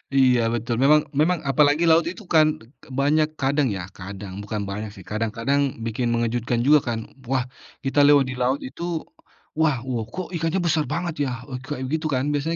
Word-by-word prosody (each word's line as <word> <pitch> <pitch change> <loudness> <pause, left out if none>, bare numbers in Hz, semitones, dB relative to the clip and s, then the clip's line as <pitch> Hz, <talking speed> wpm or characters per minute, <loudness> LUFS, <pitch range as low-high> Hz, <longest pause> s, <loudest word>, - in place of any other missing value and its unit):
Iya 130 -2 +5
betul, 120 +1 -1
memang 150 +2 +6
memang 155 +4 +1
apalagi 145 +3 +3
laut 165 0 +4
itu 185 +5 -6
kan 155 -1 +6 0.2
de - - -16 0.3
banyak 150 +2 +3
kadang 140 +1 +2
ya, 95 - -4 0.2
kadang, 95 0 -7
bukan 105 0 -4
banyak 105 +2 -4
sih, 95 - -12
kadang-kadang 115 +6 0 0.2
bikin 115 +2 -1
mengejutkan 120 0 0
juga 150 +3 +6
kan. 115 -1 -1 0.3
Wah 130 0 +1 0.4
kita 135 +2 +1
lewat 145 -1 +6
di - - -4
laut 130 +3 +1
itu, 135 +6 -7 0.8
"Wah! 150 -7 +2
Wow, 125 -4 -2
kok 185 +10 -6
ikannya 165 +3 0
besar 160 -2 +2
banget 165 -4 -2
ya?" - - -2 0.2
Eee, 130 - -4
kayak 135 0 -5
gitu 160 +1 -1
kan 130 -4 0
biasanya 150 +3 -1
135 Hz, 185 wpm, -23 LUFS, 120-155 Hz, 0.8 s, memang